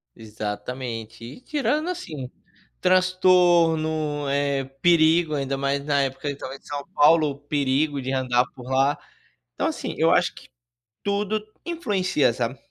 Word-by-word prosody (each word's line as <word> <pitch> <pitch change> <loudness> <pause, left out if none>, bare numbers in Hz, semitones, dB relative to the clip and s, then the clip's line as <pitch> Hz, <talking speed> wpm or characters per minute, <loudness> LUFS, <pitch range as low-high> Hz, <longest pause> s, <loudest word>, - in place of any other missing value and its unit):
Exatamente, 115 +1 -6
e 120 - -9
tirando 300 +3 -1
assim, 155 - -6 0.5
transtorno, 170 -5 +3
eh, 140 -1 0 0.2
perigo 165 -1 +4
ainda 135 -1 -2
mais 140 +1 -1
na 145 -1 +2
época 135 +1 -3
eu 145 - -1
estava 135 -1 -7
em - - -14
São 145 -1 -6
Paulo 155 0 +5
o 140 0 -7
perigo 145 0 0
de 130 +1 -3
andar 125 -2 +2
por 125 -1 -11
lá. 135 +2 +2 0.6
Então, - - 0
assim, - - -4
eu - - +3
acho - - +2
que - - -14 0.6
tudo 205 +1 -1 0.2
influencia, 195 - +1
sabe? 120 +2 -3
145 Hz, 140 wpm, -24 LUFS, 130-175 Hz, 0.6 s, Paulo